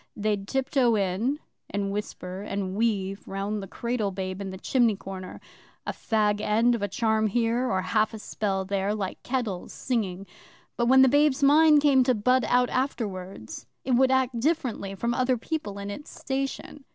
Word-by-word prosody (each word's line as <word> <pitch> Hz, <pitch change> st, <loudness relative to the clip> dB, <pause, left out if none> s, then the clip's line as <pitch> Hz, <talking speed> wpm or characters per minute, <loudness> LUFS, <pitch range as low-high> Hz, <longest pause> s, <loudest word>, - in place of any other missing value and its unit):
They'd 205 Hz, -1 st, -1 dB
tiptoe 265 Hz, -2 st, +2 dB
in 205 Hz, +8 st, 0 dB, 0.3 s
and 200 Hz, 0 st, -2 dB
whisper 195 Hz, -2 st, -5 dB
and 200 Hz, -2 st, -3 dB
weave 200 Hz, -3 st, -1 dB
round 200 Hz, +2 st, -3 dB
the 195 Hz, -, -7 dB
cradle 235 Hz, 0 st, -2 dB
babe 185 Hz, 0 st, -4 dB
in 195 Hz, -, -4 dB
the 190 Hz, -, -7 dB
chimney 235 Hz, +1 st, +2 dB
corner 190 Hz, -1 st, -8 dB, 0.5 s
a -, -, -1 dB
fag 210 Hz, -2 st, 0 dB
end 225 Hz, +3 st, +3 dB
of 235 Hz, -, -2 dB
a 205 Hz, -, 0 dB
charm 220 Hz, +2 st, +1 dB
here, 235 Hz, +3 st, +1 dB
or 190 Hz, -1 st, 0 dB
half 215 Hz, +4 st, +1 dB
a 220 Hz, -, -7 dB
spell 195 Hz, -2 st, -2 dB
there 200 Hz, +1 st, -1 dB
like 195 Hz, -3 st, -4 dB
kettles 235 Hz, -8 st, -3 dB
singing; 200 Hz, -7 st, -2 dB, 0.5 s
but 235 Hz, -, 0 dB
when 265 Hz, +1 st, +7 dB
the -, -, +6 dB
babe's 285 Hz, +1 st, +3 dB
mind 300 Hz, +1 st, +6 dB
came 270 Hz, -3 st, +5 dB
to 255 Hz, -1 st, +3 dB
bud 250 Hz, +4 st, +2 dB
out 250 Hz, 0 st, +2 dB
afterwards, 195 Hz, -, -4 dB, 0.2 s
it 265 Hz, -, -1 dB
would 260 Hz, +1 st, +4 dB
act 260 Hz, -2 st, +1 dB
differently 245 Hz, -9 st, -1 dB
from 235 Hz, +4 st, -1 dB
other 255 Hz, 0 st, +1 dB
people 230 Hz, -6 st, -4 dB
in 200 Hz, 0 st, -5 dB
its 295 Hz, +8 st, -8 dB
station. 275 Hz, +1 st, -4 dB
220 Hz, 175 wpm, -26 LUFS, 195-255 Hz, 0.5 s, when